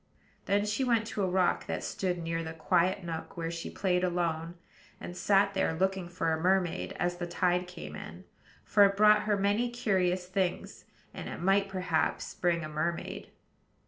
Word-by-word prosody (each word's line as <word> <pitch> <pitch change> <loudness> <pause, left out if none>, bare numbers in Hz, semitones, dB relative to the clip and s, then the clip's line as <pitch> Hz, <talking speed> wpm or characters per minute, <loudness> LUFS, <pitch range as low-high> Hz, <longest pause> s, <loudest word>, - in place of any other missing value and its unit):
Then 205 +1 +2
she 210 +5 0
went 230 -3 +2
to 210 - -3
a 190 - +2
rock 180 -1 +1
that - - -3
stood 180 -2 -2
near 165 0 -3
the 160 0 -6
quiet 180 +3 +1
nook 165 -1 -6
where 165 -1 -2
she 165 -1 -5
played 180 -2 0
alone, 170 -2 -1 0.4
and 175 - -7
sat 200 +1 +3
there 190 -4 0
looking 190 0 0
for 165 -2 -1
a 160 - -2
mermaid 185 -1 +1
as 175 0 -1
the 175 0 -4
tide 180 +1 +1
came 180 -1 -8
in; - - -9 0.4
for 205 - +5
it 200 0 +3
brought 210 0 +6
her 210 -1 +2
many 205 +5 +1
curious 190 -7 0
things, 185 -1 -2 0.3
and - - -6
it - - -6
might 195 +2 +2
perhaps 180 -4 -1
bring 170 -2 0
a - - -4
mermaid. 155 +3 -3
180 Hz, 180 wpm, -30 LUFS, 170-195 Hz, 0.4 s, brought